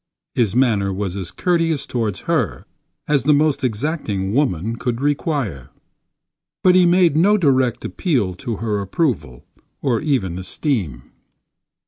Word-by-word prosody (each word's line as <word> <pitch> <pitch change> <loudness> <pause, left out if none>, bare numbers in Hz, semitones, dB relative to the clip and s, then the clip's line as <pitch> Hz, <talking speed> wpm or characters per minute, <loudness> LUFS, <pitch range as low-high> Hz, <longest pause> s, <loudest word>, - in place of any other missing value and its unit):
His 110 -4 +1
manner 110 -7 +2
was 95 -1 -3
as 95 -3 -5
courteous 165 -4 0
toward 110 -5 -2
her 125 - -1 0.4
as 145 -2 +2
the 150 +2 +4
most 150 -1 +1
exacting 110 - -2
woman 115 - 0
could 120 -1 -2
require; 140 - -1 0.9
but 185 - +6
he 180 -1 +5
made 175 -3 +4
no 200 +7 +4
direct 130 - +1
appeal 125 - 0
to 115 +5 -5
her 105 0 -2
approval 100 - -2 0.3
or 120 -5 0
even 105 - -1
esteem. 95 - -2
125 Hz, 130 wpm, -20 LUFS, 100-150 Hz, 0.9 s, but